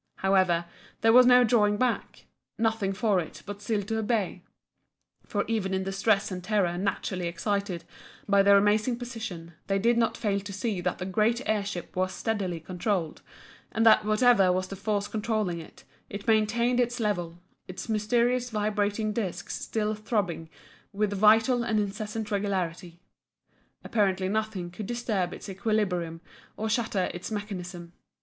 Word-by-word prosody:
However, 185 Hz, -3 st, +2 dB, 0.4 s
there 225 Hz, 0 st, +5 dB
was 250 Hz, 0 st, +8 dB
no 250 Hz, 0 st, +7 dB
drawing 210 Hz, -3 st, +3 dB
back, 250 Hz, +1 st, -2 dB, 0.3 s
nothing 220 Hz, -3 st, 0 dB
for 205 Hz, -1 st, +1 dB
it 160 Hz, -, -7 dB
but 205 Hz, 0 st, -7 dB
still 205 Hz, -1 st, -1 dB
to 220 Hz, +2 st, -2 dB
obey, 210 Hz, -5 st, -1 dB, 0.9 s
for 205 Hz, -2 st, -1 dB
even 205 Hz, -4 st, -1 dB
in 190 Hz, -, -1 dB
the 195 Hz, -, -3 dB
stress 195 Hz, +1 st, +1 dB
and 180 Hz, -1 st, -5 dB
terror 195 Hz, -4 st, +1 dB
naturally 185 Hz, -1 st, -2 dB
excited 190 Hz, 0 st, -2 dB, 0.4 s
by 200 Hz, -1 st, +5 dB
their 200 Hz, 0 st, +6 dB
amazing 210 Hz, +4 st, +2 dB
position, 220 Hz, -9 st, -7 dB
they 195 Hz, -, +1 dB
did 235 Hz, +4 st, +3 dB
not 230 Hz, -, +1 dB
fail 200 Hz, -3 st, 0 dB
to 200 Hz, +1 st, -8 dB
see 200 Hz, -1 st, -2 dB
that 180 Hz, 0 st, -1 dB
the 180 Hz, -, -5 dB
great 220 Hz, +6 st, +1 dB
air 215 Hz, -2 st, +1 dB
ship 200 Hz, -3 st, -6 dB
was 185 Hz, 0 st, 0 dB
steadily 195 Hz, -6 st, -2 dB
controlled, 175 Hz, 0 st, -2 dB, 0.5 s
and 225 Hz, +1 st, +1 dB
that 220 Hz, -1 st, +7 dB
whatever 215 Hz, -3 st, +4 dB
was 185 Hz, +1 st, -1 dB
the 195 Hz, -, -5 dB
force 205 Hz, +1 st, -1 dB
controlling 215 Hz, -5 st, -1 dB
it, 160 Hz, -, -15 dB, 0.3 s
it 205 Hz, 0 st, -7 dB
maintained 235 Hz, +3 st, +2 dB
its 245 Hz, 0 st, 0 dB
level, 175 Hz, -6 st, -1 dB, 0.3 s
its 185 Hz, +4 st, -7 dB
mysterious 240 Hz, +3 st, +1 dB
vibrating 210 Hz, 0 st, -1 dB
discs 205 Hz, -5 st, -4 dB
still 215 Hz, -1 st, -1 dB
throbbing 205 Hz, -7 st, -2 dB, 0.4 s
with 205 Hz, 0 st, 0 dB
vital 225 Hz, +5 st, +4 dB
and 220 Hz, -2 st, +1 dB
incessant 210 Hz, +1 st, -4 dB
regularity. 180 Hz, -4 st, -2 dB, 0.8 s
Apparently 195 Hz, -4 st, +1 dB
nothing 210 Hz, -4 st, -2 dB
could 195 Hz, +3 st, -7 dB
disturb 215 Hz, -7 st, -1 dB
its -, -, -9 dB
equilibrium 190 Hz, -5 st, -1 dB, 0.4 s
or 220 Hz, -, -2 dB
shatter 215 Hz, -4 st, 0 dB
its 175 Hz, -, -6 dB
mechanism. 180 Hz, -5 st, -6 dB
205 Hz, 155 wpm, -27 LUFS, 185-220 Hz, 0.9 s, was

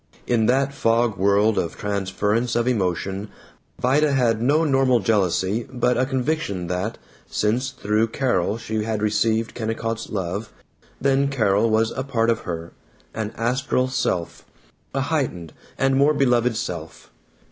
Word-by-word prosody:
In 115 Hz, -3 st, +2 dB
that 135 Hz, +2 st, +2 dB
fog 115 Hz, -3 st, +2 dB
world 100 Hz, +3 st, +3 dB
of 85 Hz, -, -3 dB
transference 105 Hz, +3 st, -1 dB
of 120 Hz, 0 st, +1 dB
emotion 95 Hz, -2 st, -1 dB, 0.5 s
Vida 140 Hz, +3 st, +3 dB
had 115 Hz, -4 st, +2 dB
no 145 Hz, +6 st, +3 dB
normal 135 Hz, -4 st, +3 dB
jealousy 100 Hz, +1 st, +1 dB
but 125 Hz, -1 st, +1 dB
a 130 Hz, -, +1 dB
conviction 130 Hz, -, -1 dB
that, 90 Hz, +6 st, -3 dB, 0.3 s
since 120 Hz, +5 st, 0 dB
through 110 Hz, -4 st, 0 dB
Carol 115 Hz, -5 st, 0 dB
she 110 Hz, -1 st, -3 dB
had 110 Hz, -1 st, -2 dB
received 110 Hz, +1 st, +1 dB
Kennicott's 115 Hz, 0 st, -3 dB
love, 100 Hz, +1 st, -3 dB, 0.5 s
then 140 Hz, +1 st, +2 dB
Carol 110 Hz, -5 st, +2 dB
was 110 Hz, +1 st, +2 dB
a 130 Hz, -, -3 dB
part 115 Hz, -4 st, +1 dB
of 115 Hz, -, 0 dB
her, 85 Hz, -1 st, -5 dB, 0.4 s
an 110 Hz, -1 st, -3 dB
astral 125 Hz, +2 st, 0 dB
self, 90 Hz, -9 st, -2 dB, 0.5 s
a 135 Hz, -, +1 dB
heightened 130 Hz, -, -2 dB, 0.2 s
and 135 Hz, 0 st, +2 dB
more 145 Hz, +3 st, +4 dB
beloved 125 Hz, -4 st, +2 dB
self. 85 Hz, -7 st, -6 dB
115 Hz, 140 wpm, -23 LUFS, 105-130 Hz, 0.5 s, more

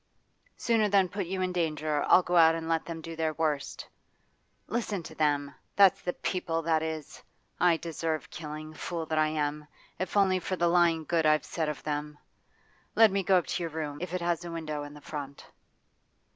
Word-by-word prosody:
Sooner 225 Hz, -3 st, +2 dB
than 195 Hz, -2 st, +4 dB
put 195 Hz, -2 st, -3 dB
you 185 Hz, +1 st, -2 dB
in 185 Hz, -, -1 dB
danger 155 Hz, -3 st, 0 dB
I'll 185 Hz, -, +6 dB
go 180 Hz, -, -1 dB
out 165 Hz, -1 st, +7 dB
and 165 Hz, 0 st, -5 dB
let 165 Hz, -1 st, 0 dB
them 165 Hz, -1 st, -6 dB
do 165 Hz, +1 st, -7 dB
their 160 Hz, -1 st, -1 dB
worst 150 Hz, -4 st, -2 dB, 0.8 s
Listen 210 Hz, -4 st, -2 dB
to 160 Hz, -, -9 dB
them! 145 Hz, -2 st, 0 dB, 0.2 s
That's 195 Hz, -2 st, +6 dB
the 180 Hz, -, -2 dB
People, 165 Hz, -3 st, -2 dB
that 160 Hz, -1 st, +2 dB
is! 160 Hz, -2 st, -5 dB, 0.4 s
I 175 Hz, -2 st, +4 dB
deserve 160 Hz, -1 st, -3 dB
killing, 155 Hz, 0 st, -7 dB
fool 165 Hz, +1 st, -4 dB
that 155 Hz, 0 st, -1 dB
I 155 Hz, -, +4 dB
am, 150 Hz, -1 st, -2 dB, 0.3 s
if 185 Hz, +2 st, -2 dB
only 190 Hz, -2 st, +4 dB
for 185 Hz, -, -3 dB
the 175 Hz, -1 st, +2 dB
lying 170 Hz, -2 st, +3 dB
good 165 Hz, 0 st, +1 dB
I've 155 Hz, 0 st, +3 dB
said 160 Hz, -3 st, -2 dB
of 150 Hz, -, -6 dB
them. 150 Hz, 0 st, -3 dB, 0.8 s
Let 225 Hz, -2 st, +7 dB
me 195 Hz, 0 st, +1 dB
go 190 Hz, 0 st, +4 dB
up 175 Hz, -, +2 dB
into -, -, -3 dB
your 165 Hz, -, -2 dB
room, 150 Hz, -2 st, -5 dB
if 180 Hz, -1 st, -4 dB
it 180 Hz, -, -2 dB
has 170 Hz, 0 st, 0 dB
a 175 Hz, -, -6 dB
window 155 Hz, -3 st, -4 dB
in 145 Hz, 0 st, -8 dB
the 150 Hz, -, -12 dB
front. 140 Hz, -2 st, -7 dB
165 Hz, 200 wpm, -29 LUFS, 155-180 Hz, 0.8 s, out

